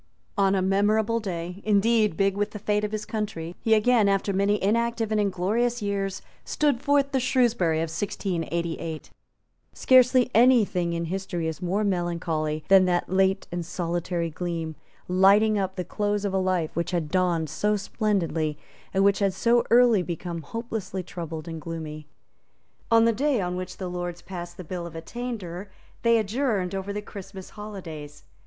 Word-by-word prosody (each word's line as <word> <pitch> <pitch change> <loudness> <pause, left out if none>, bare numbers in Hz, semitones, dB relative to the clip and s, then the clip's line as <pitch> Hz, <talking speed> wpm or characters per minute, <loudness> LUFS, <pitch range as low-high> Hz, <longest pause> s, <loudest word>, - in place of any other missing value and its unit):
On 195 -2 +3
a 190 - +1
memorable 210 +4 +2
day, 180 -2 -5
indeed, 215 -2 +3
big 195 0 +2
with 205 +1 0
the 210 - -8
fate 210 0 0
of 210 - -2
his 215 -1 -3
country, 210 -7 -4
he 225 -1 +4
again, 220 -1 +4
after 195 0 +1
many 200 +2 +2
inactive 230 +2 0
and 215 -1 +2
inglorious 210 +6 0
years, 200 -2 -2 0.2
stood 285 -5 0
forth 280 -1 +2
the 265 - +1
Shrewsbury 240 -11 +2
of 165 -1 -3
1688. 170 -3 -3 0.6
Scarcely 255 -1 +4
any 240 -1 +6
thing 175 -3 -2
in 170 0 -2
history 180 -1 -3
is 160 +3 -5
more 190 +4 0
melancholy 170 -5 -1
than 190 -1 +7
that 175 -1 0
late 190 +1 +2
and 175 0 -3
solitary 170 0 -2
gleam, 165 -1 -4 0.3
lighting 200 +4 +4
up 190 -1 -2
the 180 - -3
close 205 +1 -1
of 195 - -1
a 190 - +2
life 185 -4 0
which 170 +1 -1
had 170 -4 -2
dawned 175 -3 +1
so 210 +8 0
splendidly, 180 -7 -1 0.4
and 195 - +4
which 200 0 +4
had 195 -2 +1
so 235 +4 +3
early 235 -4 +5
become 170 -1 -5
hopelessly 210 0 -5
troubled 165 -2 -7
and 165 -1 -6
gloomy. 155 -2 -6 0.8
On 230 0 +5
the 230 - +4
day 270 +2 +1
on 180 -1 -2
which 185 0 -6
the 185 - -4
Lords 175 -1 -5
passed 175 -2 -7
the 185 - -7
Bill 175 +1 -5
of 165 - -11
Attainder, 200 -1 -6 0.3
they 230 0 +4
adjourned 215 -4 0
over 195 +1 -3
the 210 +1 -4
Christmas 195 -2 -10
holidays. 170 -9 -8
195 Hz, 170 wpm, -26 LUFS, 175-215 Hz, 0.8 s, than